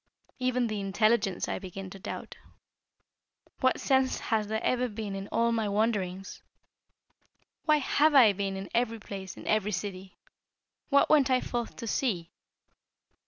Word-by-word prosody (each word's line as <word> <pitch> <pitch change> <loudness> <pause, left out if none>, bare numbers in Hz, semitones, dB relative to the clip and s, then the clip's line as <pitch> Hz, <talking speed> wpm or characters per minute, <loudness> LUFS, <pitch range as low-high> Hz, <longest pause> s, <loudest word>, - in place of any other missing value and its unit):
Even 255 -1 +1
the 215 -2 -2
intelligence 200 0 +1
I - - -2
begin 190 0 -8
to 195 - -10
doubt. - - -7 1.2
What 260 0 +2
sense 265 -1 +2
has 220 -3 -1
there 220 +1 -1
ever 250 0 +1
been 210 -2 -5
in 195 0 -5
all 235 +1 +1
my 220 -2 0
wanderings? 200 -3 -1 1.2
Why 305 -1 +5
have 295 +2 +2
I 230 -7 +8
been 195 0 -3
in 195 0 -6
every 230 -1 +1
place, 195 -3 -8
in - - -10
every 215 -1 +1
city? 190 0 -5 0.7
What 280 -1 +4
went 285 -4 +5
I 255 -1 +4
forth 240 -2 -4
to 235 - -7
see? 205 -8 -1
215 Hz, 150 wpm, -29 LUFS, 195-250 Hz, 1.2 s, I